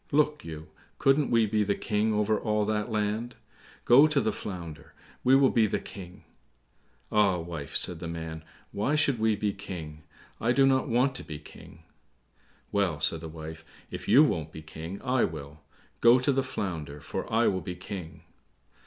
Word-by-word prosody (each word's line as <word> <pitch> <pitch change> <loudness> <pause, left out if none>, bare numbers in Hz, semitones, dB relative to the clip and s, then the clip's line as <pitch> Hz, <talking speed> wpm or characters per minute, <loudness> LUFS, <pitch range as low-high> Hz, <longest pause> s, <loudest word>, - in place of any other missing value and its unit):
Look 150 +1 +2
you, 80 -1 -8 0.3
couldn't 135 +1 +3
we 115 -1 +4
be 105 0 +1
the 100 0 0
King 105 0 0
over 105 0 +1
all 105 -1 0
that 105 +2 -1
land? 110 +2 -2 0.5
Go 135 +6 +7
to 150 -2 +2
the 110 - +1
Flounder, 80 -7 -8 0.3
we 130 +1 +6
will 135 -1 +5
be 110 -2 +3
the - - 0
King." 90 -2 -11 0.9
"Ah, 100 -4 +3
wife," 80 -4 -6
said 90 -2 0
the 85 - -5
man, 80 -1 -6 0.3
"why 105 +9 0
should 140 -5 +2
we 110 -1 +2
be 105 0 -1
King? 85 -6 -8 0.4
I 120 +2 +2
do 135 +1 +5
not 130 -1 +2
want 125 +3 +2
to - - -7
be 75 - -7
King." 80 +2 -14 0.9
"Well," 95 -7 +1
said 80 +1 0
the 80 - -7
wife, 80 0 -8 0.3
"if - - -7
you 145 - +7
won't 80 - -1
be 80 - -9
King, 80 +5 -7
I 130 -1 +2
will; 75 -1 -5 0.4
go 120 +2 +7
to 130 +2 +2
the 135 0 +2
Flounder, 80 - -4
for - - -5
I 115 +2 +3
will 95 -3 +1
be 90 +2 -5
King." 80 -4 -8
100 Hz, 180 wpm, -28 LUFS, 80-120 Hz, 0.9 s, Go